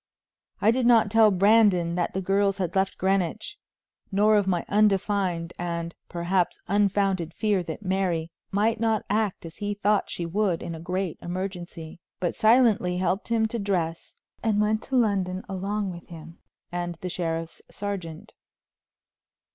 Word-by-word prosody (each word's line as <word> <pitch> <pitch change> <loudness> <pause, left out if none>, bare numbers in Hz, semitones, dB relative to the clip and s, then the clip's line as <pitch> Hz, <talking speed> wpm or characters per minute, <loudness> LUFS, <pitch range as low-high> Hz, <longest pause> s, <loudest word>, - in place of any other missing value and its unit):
I 215 - +5
did 245 0 +1
not 225 -4 +5
tell 225 -1 +6
Brandon 195 -3 +4
that 175 0 -2
the 190 - 0
girls 195 +1 +2
had 180 -2 -3
left 190 0 +1
Greenwich, 195 - -1 0.5
nor 210 +2 +4
of 205 -2 +2
my 175 -3 0
undefined, 195 -4 +1
and, 170 -1 -3 0.2
perhaps, 175 +1 0
unfounded 195 -4 +1
fear 210 -3 +1
that 175 +4 -7
Mary 180 -4 0 0.2
might 215 +3 +1
not 225 -2 +1
act 210 -4 0
as 165 - -10
he 205 -1 -3
thought 205 0 +1
she 170 - -3
would 185 0 0
in 170 - -5
a 160 - -7
great 180 0 -3
emergency, 175 -3 -6 0.2
but 175 - -1
silently 220 -6 +3
helped 185 +2 -1
him 225 -1 +2
to 235 - -3
dress 175 -5 -2 0.3
and 215 -2 +1
went 215 +1 +1
to 265 - -3
London 195 -6 +1
along 195 +1 -2
with 170 -1 -10
him 165 0 -11 0.3
and 175 -1 -3
the 185 - -3
sheriff's 165 -2 -3
sergeant. 200 -2 -6
190 Hz, 155 wpm, -26 LUFS, 175-210 Hz, 0.5 s, tell